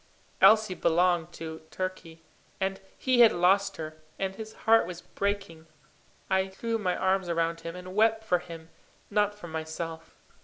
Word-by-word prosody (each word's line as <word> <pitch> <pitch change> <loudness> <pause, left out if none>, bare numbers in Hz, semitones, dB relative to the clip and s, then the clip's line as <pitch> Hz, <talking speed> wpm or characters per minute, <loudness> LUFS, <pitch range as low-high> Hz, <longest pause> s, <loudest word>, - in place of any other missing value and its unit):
Elsie 215 -3 +6
belonged 175 0 +2
to 160 -1 -7
Turkey, 175 -3 -6 0.4
and 195 0 -2 0.2
he 255 -2 +1
had 235 -2 +9
lost 195 +3 +2
her, 155 -1 -6 0.2
and 190 -1 -2
his 220 0 -8
heart 225 -4 +5
was 180 -1 -7
breaking. 195 -5 -3 0.6
I 190 0 +2
threw 225 +4 -3
my 180 -4 0
arms 190 -1 +1
round 165 0 0
him, 165 +1 -6
and 180 0 -8
wept 220 +2 +3
for 180 -5 +2
him, 165 -2 -10 0.4
not 205 0 +2
for 205 -4 -10
myself. 160 0 -6
185 Hz, 155 wpm, -28 LUFS, 165-205 Hz, 0.6 s, had